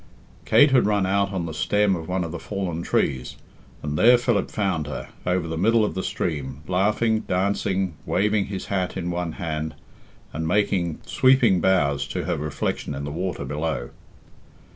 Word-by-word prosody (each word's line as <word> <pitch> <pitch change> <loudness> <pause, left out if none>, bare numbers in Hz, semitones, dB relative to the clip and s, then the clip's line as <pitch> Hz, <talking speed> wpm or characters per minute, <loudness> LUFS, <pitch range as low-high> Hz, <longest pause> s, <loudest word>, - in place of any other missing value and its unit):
Kate 145 -1 +6
had 125 -5 +4
run 100 -2 +2
out 100 +1 +1
on 95 -4 -2
the 80 - -5
stem 105 +3 +2
of 80 -2 -6
one 90 0 -1
of 85 - -5
the 85 - -5
fallen 95 -5 -3
trees, 65 -6 -1 0.5
and 75 +1 -2
there 120 +2 +7
Philip 120 -5 0
found 95 -8 -1
her, 75 - -6 0.2
over 90 -2 +1
the 80 0 -3
middle 110 +3 +4
of - - -3
the 95 - -2
stream, 70 -6 -3
laughing, 105 +4 +2
dancing, 95 -1 0
waving 105 +1 +1
his 95 -2 -5
hat 95 -1 -2
in 90 -1 -2
one 85 -2 -3
hand, 80 -2 -4 0.6
and 80 0 -2
making 90 -4 0
sweeping 125 -8 +4
bows 70 -7 +2
to 90 +7 -3
her 85 +1 -1
reflection 75 -1 -3
in 70 - -5
the 70 - -4
water 90 -2 -3
below. 75 -3 -3
90 Hz, 175 wpm, -24 LUFS, 80-100 Hz, 0.6 s, there